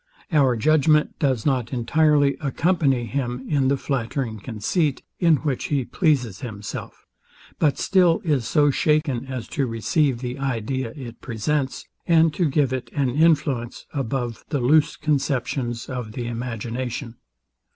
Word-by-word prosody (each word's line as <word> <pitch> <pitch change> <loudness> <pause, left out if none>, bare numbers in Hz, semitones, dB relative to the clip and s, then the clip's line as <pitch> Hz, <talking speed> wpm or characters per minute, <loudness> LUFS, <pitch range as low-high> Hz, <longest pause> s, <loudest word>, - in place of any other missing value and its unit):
Our 135 -6 +3
judgment 150 +3 +3
does 130 -6 0
not 130 -5 0
entirely 145 +3 +3
accompany 140 -4 +1
him 125 0 -3
in 140 -3 +2
the 140 +1 +2
flattering 125 -4 -2
conceit, 130 - -1 0.2
in 165 -3 +5
which 145 -4 -2
he 140 -4 0
pleases 125 - 0
himself; 105 -5 -7 0.5
but 150 -3 +2
still 180 -4 +3
is 140 -8 0
so 145 +4 +3
shaken 145 -4 +1
as 130 -4 -5
to 140 -5 -1
receive 125 +4 +1
the 125 +2 -5
idea 130 -1 -2
it 120 -4 -9
presents, 130 +4 -2 0.2
and 165 -2 +4
to 170 -2 +1
give 140 -2 +1
it 130 -1 -4
an 135 -4 +1
influence 140 -5 +1
above 125 -3 -3
the 145 - 0
loose 145 +5 +3
conceptions 135 -4 -1
of 125 -5 -5
the 120 0 -4
imagination. 120 +1 -4
135 Hz, 140 wpm, -23 LUFS, 120-150 Hz, 0.5 s, in